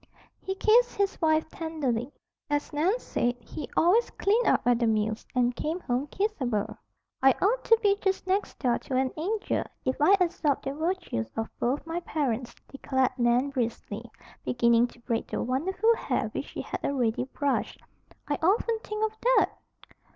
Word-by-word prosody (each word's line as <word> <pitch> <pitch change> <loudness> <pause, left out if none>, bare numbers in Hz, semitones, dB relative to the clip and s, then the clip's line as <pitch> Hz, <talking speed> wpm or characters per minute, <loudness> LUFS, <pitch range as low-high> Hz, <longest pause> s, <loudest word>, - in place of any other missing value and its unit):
He 385 - -3
kissed 475 +5 +4
his 400 0 -1
wife 315 -1 +3
tenderly. 285 -7 -2 0.4
As 290 +1 -1
Nan 345 +10 +2
said, 245 - -1
he 270 - -8
always 395 +8 +4
"cleaned 440 +5 +1
up" - - +4
at 245 -1 +3
the 235 - +2
mills 215 0 0
and 245 -1 +2
"came 320 +4 -2
home 255 +1 -1
kissable." 285 - -1 0.5
"I 270 0 +6
ought 450 +6 +2
to 455 - +6
be 400 -1 +4
just 385 -1 0
next 385 +2 -1
door 245 -2 +1
to 260 - -5
an 260 0 +1
angel, 405 +7 -1 0.2
if 260 +3 -1
I 375 +7 +7
absorbed 330 -5 +1
the 270 - -2
virtues 315 - -2
of 225 - -2
both 260 +6 0
my 330 +1 -2
parents," 260 -8 -2
declared 265 -1 0
Nan 245 +3 +3
briskly, 235 -3 -3 0.3
beginning 235 0 +3
to 240 - -18
braid 230 -1 -2
the - - -2
wonderful 380 - +1
hair - - -1
which - - -4
she - - -6
had - - -5
already 250 -3 0
brushed. 280 +1 -2 0.5
"I 290 - -1
often 440 +6 +2
think 425 0 -2
of 435 0 -4
that." - - +4
290 Hz, 170 wpm, -28 LUFS, 245-385 Hz, 0.5 s, I